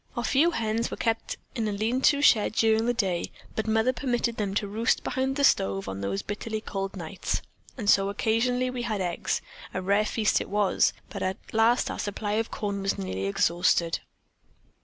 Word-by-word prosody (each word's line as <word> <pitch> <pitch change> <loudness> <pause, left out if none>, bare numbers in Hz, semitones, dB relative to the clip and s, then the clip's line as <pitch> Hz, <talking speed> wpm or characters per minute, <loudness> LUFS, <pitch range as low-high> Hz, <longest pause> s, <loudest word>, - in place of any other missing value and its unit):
Our 240 - -1
few 295 +8 +4
hens 230 -5 -1
were - - -5
kept 225 -1 -1 0.2
in 225 -3 -1
a - - 0
lean 220 +6 0
to 285 0 0
shed 215 -6 +5
during 220 +1 +3
the - - +4
day, 190 -7 -1 0.2
but 220 - -2
Mother 220 +3 +2
permitted 240 -3 -1
them 200 -2 -2
to 205 - 0
roost 220 +3 0
behind 265 +1 -1
the 285 - 0
stove 95 - +2
on 95 0 -5
those 100 0 -2
bitterly 220 +1 -4
cold 195 -2 -4
nights, 175 +1 -3 0.3
and 220 -5 -4
so 195 -1 +5
occasionally 245 +5 +1
we 250 -1 -4
had 220 -3 -2
eggs, 185 +2 -1 0.3
and 185 - -2
a - - -10
rare 200 +2 +3
feast 215 -1 +1
it - - -6
was, 205 -1 +2 0.2
but - - -5
at 190 0 -1 0.2
last 225 +2 +3
our - - -6
supply 205 0 -3
of 220 +2 0
corn 200 -1 -3
was 195 0 0
nearly 95 0 -3
exhausted. 170 - +2
215 Hz, 200 wpm, -27 LUFS, 195-230 Hz, 0.3 s, shed